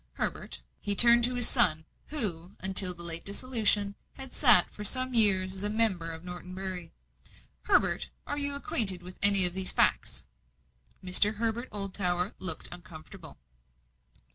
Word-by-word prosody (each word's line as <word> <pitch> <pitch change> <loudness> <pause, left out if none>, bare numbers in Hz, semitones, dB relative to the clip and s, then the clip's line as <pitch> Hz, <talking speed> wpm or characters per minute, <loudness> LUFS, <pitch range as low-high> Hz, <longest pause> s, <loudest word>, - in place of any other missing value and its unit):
Herbert" - - -5 0.2
he 205 - -3
turned 235 +2 +6
to 250 +1 -4
his 245 -1 +2
son, 155 0 +4 0.2
who, 195 - -4
until 190 -1 +1
the 170 - -5
late 170 -1 -3
dissolution, 205 -2 -2 0.2
had 265 -1 -12
sat 240 - +5
for 210 - -9
some 255 +4 0
years 190 -5 +5
as 200 +2 -4
member 210 -6 -1
for 165 - -18
Norton 180 +1 -10
Bury 185 -3 -7 0.7
"Herbert, - - 0 0.2
are 290 - -5
you 285 0 -3
acquainted 195 -9 -3
with 180 +1 -12
any 200 -2 +6
of 175 - +2
these 190 0 -1
facts?" 60 - -1 0.8
Mr. 205 +4 +3
Herbert 230 +3 -4
Oldtower 190 -2 -4
looked 165 -4 -4
uncomfortable. 175 -3 -12
195 Hz, 145 wpm, -27 LUFS, 180-225 Hz, 0.8 s, turned